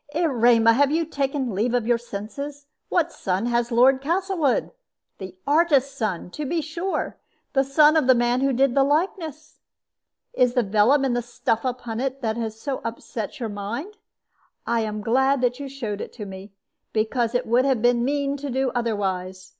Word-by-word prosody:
"Erema, 240 -8 +4
have 280 +3 +3
you 325 +2 +1
taken 275 -5 -2
leave 230 +6 0
of 240 -3 0
your 240 0 +2
senses? 275 +7 -7 0.2
What 340 -1 +1
son 190 +3 -2
has 240 0 0
Lord 260 +3 +4
Castlewood? 340 -2 0 0.5
The 190 -1 -8
artist's 285 -3 +3
son, 190 -5 -3
to 300 - -5
be 330 +4 -1
sure; 335 +5 -3 0.3
the 270 -2 +3
son 295 +3 +5
of 305 -5 +3
the 260 - +7
man 240 +1 +1
who 275 0 +2
did 265 0 +2
the 275 - +4
likeness. 315 +1 -2 0.7
Is 250 -1 +2
it - - -17
the 245 - +3
vellum 220 +8 +3
and 250 -2 0
the 245 - 0
stuff 230 -1 -2
upon 245 -3 -3
it 270 +1 -3
that 220 -1 0
has 225 -2 -4
so 275 +2 -4
upset 230 0 -5
your 230 -3 -3
mind? 230 - -5 0.7
I 235 0 +1
am 215 -1 -3
glad 265 +5 +2
that 250 +1 0
you 280 -1 -6
showed 230 -7 -5
it - - -6
to 210 - -7
me, 190 +1 -9 0.4
because 230 +2 0
it 245 - +1
would 245 +3 +3
have 260 -5 +1
been 240 -1 +3
mean 280 +1 0
to 285 0 -5
do 260 0 0
otherwise. 190 -5 -2
250 Hz, 185 wpm, -24 LUFS, 225-280 Hz, 0.7 s, the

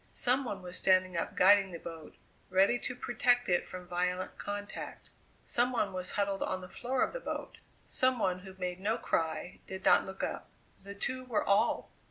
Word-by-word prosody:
Some 255 +2 +3
one 195 -5 -5
was 180 0 -3
standing 185 -1 +3
up 170 - -2
guiding 195 +1 +6
the 170 - -5
boat, 165 -2 -9 0.3
ready 195 +6 +4
to 245 - -4
protect 245 0 +2
it 175 -1 +1
from 180 -1 -8
violent 180 +1 -1
contact; 205 0 -6 0.3
some 245 +1 +2
one 205 -6 0
was 185 0 -2
huddled 200 -1 0
on 185 0 -1
the 180 - -8
floor 250 +7 -1
of - - -1
the - - -3
boat - - -5 0.3
some 255 0 +2
one 185 -5 0
who 190 0 -11
made 180 -1 -3
no 215 +4 0
cry, 160 +1 -2
did 190 0 -7
not - - +5
look 190 0 -6
up. - - -3 0.3
They 200 +1 -9
two 255 +5 -3
were 235 -4 0
all! 200 0 +2
195 Hz, 195 wpm, -32 LUFS, 180-235 Hz, 0.3 s, guiding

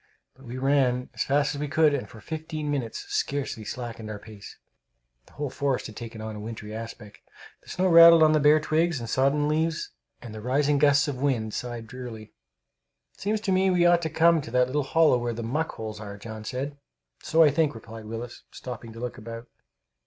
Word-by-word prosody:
But 135 +1 -18
we 120 +1 -7
ran 130 -2 +1
as - - -5
fast 145 +1 +1
as 145 - -5
we 150 - -1
could, 155 0 +3
and 140 - -3
for 115 - -12
fifteen 155 +2 -5
minutes 130 -6 -3
scarcely 135 -5 -2
slackened 115 -1 -6
our 105 - -5
pace. 105 -1 -12 0.7
The - - -21
whole 145 -2 -4
forest 135 -1 -1
had 110 - -8
taken 115 -2 -8
on 110 0 -6
a - - -7
wintry 110 0 -7
aspect. 110 -2 -8 0.4
The - - -18
snow 185 - -1
rattled 170 -1 +9
on 155 - +6
the 155 - +3
bare 150 +1 +5
twigs 160 0 +1
and 115 - -6
sodden 140 +5 +2
leaves, 160 +1 -1 0.3
and 120 -3 -10
the 110 - -7
rising 140 +4 +1
gusts 145 0 +4
of 135 -3 -4
wind 115 -7 0
sighed 120 -2 -5
drearily. 115 -2 -9 0.8
"It - - -21
seems 210 +2 -1
to 200 - -1
me 190 +1 +3
we 175 -1 +3
ought 175 0 +5
to 160 - -2
come 165 +1 +4
to 135 - -9
that 125 +1 +3
little 140 +4 -1
hollow 145 -1 +3
where 120 0 -2
the 115 +1 -5
muck 150 +8 -2
holes 110 -1 -6
are," 100 -2 -8
John 110 +1 -8
said. 140 +4 -4 0.4
"So 165 +1 +4
I 150 - +5
think," 145 -2 +1
replied 115 0 -10
Willis, 115 +2 -7
stopping 120 -2 -8
to 115 - -10
look 125 +1 -5
about. 115 +1 -8
130 Hz, 210 wpm, -26 LUFS, 115-150 Hz, 0.8 s, rattled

